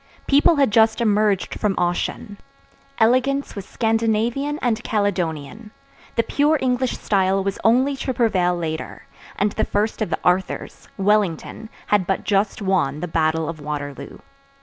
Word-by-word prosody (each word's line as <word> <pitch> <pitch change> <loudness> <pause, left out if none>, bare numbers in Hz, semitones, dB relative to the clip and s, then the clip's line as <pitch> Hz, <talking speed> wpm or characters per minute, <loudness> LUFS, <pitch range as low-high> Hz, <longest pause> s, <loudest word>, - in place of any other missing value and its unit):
_ - - -31
People 290 +4 +4
had 275 -6 +2
just 220 +1 +4
emerged 210 -4 +1
from 205 -3 0
Ossian; 180 +3 -2 0.6
elegance 255 +5 +2
was 200 -2 -7
Scandinavian 230 +5 0
and 240 -2 -1
Caledonian; 200 -1 -2 0.5
the 230 - +2
pure 295 +6 +2
English 255 -1 0
style 195 -1 +1
was 195 0 -3
only 260 +5 +3
to 265 - -2
prevail 195 -8 +1
later, 160 -2 -5 0.3
and 205 +1 0
the - - -1
first 215 +2 -1
of 215 - 0
the 160 - -1
Arthurs, 180 +1 -1
Wellington, 205 +1 0 0.2
had 200 -4 +1
but 195 - -1
just 200 0 0
won 190 -7 0
the 180 - -3
battle 160 -1 0
of 165 -1 -6
Waterloo. 145 -1 -6
205 Hz, 150 wpm, -21 LUFS, 180-230 Hz, 0.6 s, People